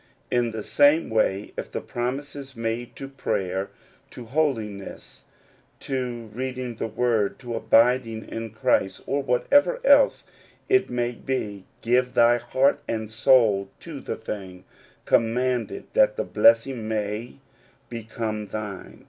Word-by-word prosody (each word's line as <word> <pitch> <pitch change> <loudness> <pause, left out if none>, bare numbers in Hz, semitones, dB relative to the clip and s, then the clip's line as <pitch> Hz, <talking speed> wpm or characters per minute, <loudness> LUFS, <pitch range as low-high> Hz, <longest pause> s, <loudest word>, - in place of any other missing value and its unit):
In 120 -1 +2
the 110 -2 -5
same 145 +2 +3
way, 105 -2 0
if - - -6
the - - -3
promise 130 +5 -4
is 135 -2 -9
made 115 +1 -3
to 135 - -7
prayer, 95 -8 -2 0.4
to 120 - -10
holiness, 115 -8 -3 0.6
to 120 -4 -4
reading 125 -1 -4
the - - -2
word, 110 -3 0
to 120 -3 -7
abiding 115 0 +2
in 115 0 -5
Christ, 100 -2 0
or 140 +1 0
whatever 285 - +3
else - - +5 0.4
it 390 -1 +3
may 120 0 -1
be, 105 -6 -4 0.2
give 125 +2 +2
thy 120 0 +5
heart 130 +4 +2
and 110 -1 -3
soul 110 -4 +4
to 160 -4 -8
the - - -4
thing 95 -5 -7 0.4
commanded, 120 0 +1
that - - +4
the - - -1
blessing 135 - +3
may 105 - -3 0.5
become 110 -2 -4
thine. 105 -1 -7
120 Hz, 130 wpm, -25 LUFS, 110-130 Hz, 0.6 s, else